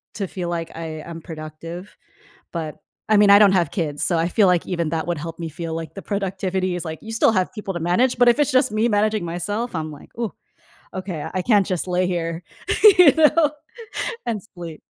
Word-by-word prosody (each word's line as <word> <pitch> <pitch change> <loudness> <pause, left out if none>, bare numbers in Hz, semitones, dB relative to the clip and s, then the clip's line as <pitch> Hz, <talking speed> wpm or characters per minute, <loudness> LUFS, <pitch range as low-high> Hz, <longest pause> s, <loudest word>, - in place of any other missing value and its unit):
to 200 -3 -3
feel 180 -1 -5
like 165 -1 -3
I 160 -1 -6
am 165 +1 -8
productive, 165 +3 -8 0.6
but 160 -3 -4 0.3
I 215 - +5
mean, 205 0 +6
I 200 - +9
don't 205 -2 +7
have 175 -3 +2
kids, 150 -6 -3
so 175 - +1
I 165 +1 +1
feel 200 +2 +4
like 180 -2 +2
even 170 -3 -1
that 160 0 -2
would 175 -1 -1
help 165 +1 -6
me 165 -1 -4
feel 165 +1 -5
like 165 -1 -6
the 195 - -6
productivity 190 -2 -2
is 175 -1 -5
like 160 0 -5
you 225 - -8
still 225 - +4
have 185 -3 +1
people 210 -4 -5
to - - -2
manage, 210 +10 +2
but 245 -1 +6
if 240 - +3
it's 295 - +3
just 255 -1 +3
me 215 +2 +1
managing 210 -2 +1
myself, 205 +7 -3
I'm 155 -1 -3
like, 145 - -13
"Ooh, 230 -3 -3 0.6
ok, 185 -5 -5
I 185 - 0
can't 205 -1 +4
just 185 -3 -2
lay 180 0 +1
here," 170 -1 -2 0.6
you 340 -6 +9
know, 305 -1 +4 0.7
"and 220 -5 -2
sleep." 170 -3 -8
180 Hz, 215 wpm, -22 LUFS, 165-210 Hz, 0.7 s, I